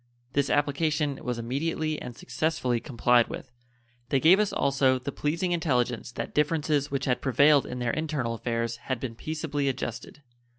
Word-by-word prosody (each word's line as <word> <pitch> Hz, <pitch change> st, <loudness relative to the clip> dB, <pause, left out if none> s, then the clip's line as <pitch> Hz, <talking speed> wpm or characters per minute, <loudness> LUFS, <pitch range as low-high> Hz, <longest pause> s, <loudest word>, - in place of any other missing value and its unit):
This 140 Hz, 0 st, +1 dB
application 145 Hz, 0 st, 0 dB
was 125 Hz, -1 st, -2 dB
immediately 155 Hz, +6 st, -2 dB
and 120 Hz, -, -7 dB
successfully 130 Hz, -2 st, -1 dB
complied 120 Hz, -2 st, +3 dB
with. 130 Hz, -, -8 dB, 0.6 s
They 135 Hz, -, +3 dB
gave 175 Hz, +8 st, +6 dB
us 210 Hz, -2 st, +1 dB
also 135 Hz, -2 st, +2 dB
the 130 Hz, +3 st, -5 dB
pleasing 165 Hz, +6 st, -1 dB
intelligence 125 Hz, -8 st, 0 dB
that -, -, -5 dB
differences 150 Hz, -1 st, +1 dB
which 140 Hz, -1 st, -2 dB
had 125 Hz, -2 st, 0 dB
prevailed 140 Hz, +2 st, +4 dB
in 125 Hz, -, -5 dB
their 120 Hz, -1 st, -1 dB
internal 150 Hz, -7 st, -2 dB
affairs 115 Hz, 0 st, -2 dB
had 130 Hz, 0 st, -4 dB
been 125 Hz, -2 st, -4 dB
peaceably 150 Hz, +2 st, -2 dB
adjusted. 130 Hz, +2 st, -5 dB
140 Hz, 160 wpm, -27 LUFS, 125-150 Hz, 0.6 s, gave